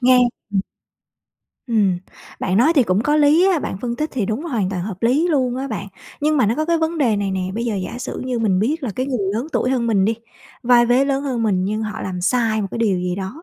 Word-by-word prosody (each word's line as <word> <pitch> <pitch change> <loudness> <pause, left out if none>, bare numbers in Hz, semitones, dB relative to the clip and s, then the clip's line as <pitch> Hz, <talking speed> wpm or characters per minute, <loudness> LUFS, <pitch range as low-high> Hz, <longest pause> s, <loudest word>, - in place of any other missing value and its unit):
Nghe 255 0 +5 0.4
ừm. 195 - +2 1.1
Ừm, 205 -7 +2 0.4
bạn 185 0 0
nói 265 +9 +5
thì 270 - +5
cũng 185 -2 +1
có 295 +4 +2
lý 305 +4 +5
á, 350 - +2
bạn 190 - -4
phân 240 -1 -2
tích 305 +3 -2
thì 230 -7 -1
đúng, 225 +8 -2
hoàn 220 - -1
toàn 180 -3 -3
hợp 190 -2 -6
lý 275 +9 +3
luôn 255 -6 +1
á 270 +1 -3
bạn. 210 -3 -5 0.3
Nhưng 305 +1 +2
mà 255 - +3
nó 225 - +1
có 310 - -1
cái 335 +1 +1
vấn 320 0 -1
đề 235 -7 +2
này 200 -1 -1
nè, 190 - -2
bây 230 - -2
giờ 230 -3 -1
giả 195 +6 -5
sử 250 - -5
như 250 -2 -2
mình 200 -5 +2
biết 290 - 0
là 245 - -2
cái 255 +1 -1
người 255 -4 -1 0.2
lớn 240 +7 -2
tuổi 255 - +1
hơn 245 -3 0
mình 200 -4 +2
đi, 225 - +1 0.5
vai 240 -1 +5
vế 250 +3 +4
lớn 275 0 0
hơn 250 -5 -2
mình, 190 -4 +1
nhưng 215 +3 -2
họ 215 -2 -5
làm 180 -1 -4
sai 220 +2 +1
một 195 - -3
cái - - -5
điều 205 -5 +1
gì 180 0 -2
đó, 200 - -6
235 Hz, 270 wpm, -20 LUFS, 200-270 Hz, 1.1 s, Nghe